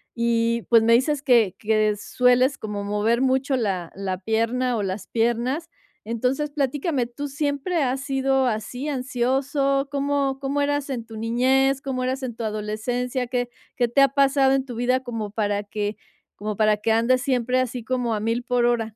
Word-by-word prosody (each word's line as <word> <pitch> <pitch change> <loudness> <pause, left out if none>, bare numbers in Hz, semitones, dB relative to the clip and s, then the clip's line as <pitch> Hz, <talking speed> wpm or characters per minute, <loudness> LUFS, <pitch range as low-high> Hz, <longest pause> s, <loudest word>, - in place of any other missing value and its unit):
Y, 235 0 +1
pues, 230 -2 +6
me 230 +1 +4
dices 275 +4 +2
que 235 -9 +3
que 215 -1 +2
sueles 250 +5 +2
como 210 -2 -5
mover 210 +4 +1
mucho 265 +1 +1
la 190 -7 -2
la 190 -1 -3
pierna 230 +4 0
o 205 - -1
las 190 +1 -4
piernas. 240 +8 0 0.4
Entonces 255 +6 -1
platícame, 280 -1 -1
¿tú 265 +5 -6
siempre 290 +3 -1
has 260 +1 0
sido 270 -1 +1
así, 245 +5 -3
ansioso? 275 +2 0
¿Cómo? 280 -1 0
¿Cómo 280 +1 -1
eras 290 0 -1
en 235 -4 -4
tu 225 -1 -10
niñez? 260 +4 +2
¿Cómo 265 -3 -3
eras 260 +1 -2
en 240 -3 -3
tu 230 - -6
adolescencia? 235 +4 -2
¿Qué? 245 -1 -2 0.3
¿Qué 240 -1 +2
te 275 +4 +3
ha 275 - +7
pasado 275 -1 +3
en 270 0 +1
tu 245 - -7
vida 250 +2 +1
como 225 -5 -5
para 205 -1 -1
que 205 0 -4 0.4
como 210 0 -4
para 215 -1 +3
que 225 +2 0
andes 245 +3 +3
siempre 255 -2 +1
así 250 -2 -2
como 245 -1 -1
a - - -2
1000 230 +2 -1
por 245 -1 +1
hora? 225 -3 0
245 Hz, 180 wpm, -23 LUFS, 225-270 Hz, 0.4 s, ha